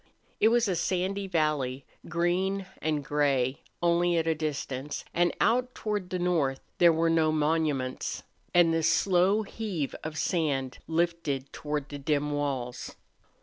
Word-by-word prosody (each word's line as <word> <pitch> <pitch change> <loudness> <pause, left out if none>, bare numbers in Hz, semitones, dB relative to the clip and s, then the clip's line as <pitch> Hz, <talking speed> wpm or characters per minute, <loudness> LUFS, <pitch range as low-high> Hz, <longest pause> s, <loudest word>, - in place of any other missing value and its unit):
It 215 - +5
was 235 0 +3
a 190 - 0
sandy 190 +3 -1
valley, 150 -6 0 0.2
green 185 +3 0 0.2
and 150 -2 -1
gray 140 -3 +1 0.2
only 175 0 +3
at 165 - +1
a 165 - +2
distance, 150 -3 -4
and 175 0 +3
out 250 +2 +2
toward 210 -4 -3
the 185 - -2
north 160 -7 +1 0.2
there 170 -1 +7
were 165 +1 +2
no 160 -1 +3
monuments, 150 -4 0 0.3
and 175 -2 +5
the 165 - +1
slow 185 +5 +3
heave 195 -9 -4
of 155 0 -5
sand 140 -8 -1
lifted 165 -5 -1
toward 150 -2 -3
the 145 - -6
dim 145 +1 0
walls. 135 -4 -3
160 Hz, 145 wpm, -28 LUFS, 145-175 Hz, 0.3 s, there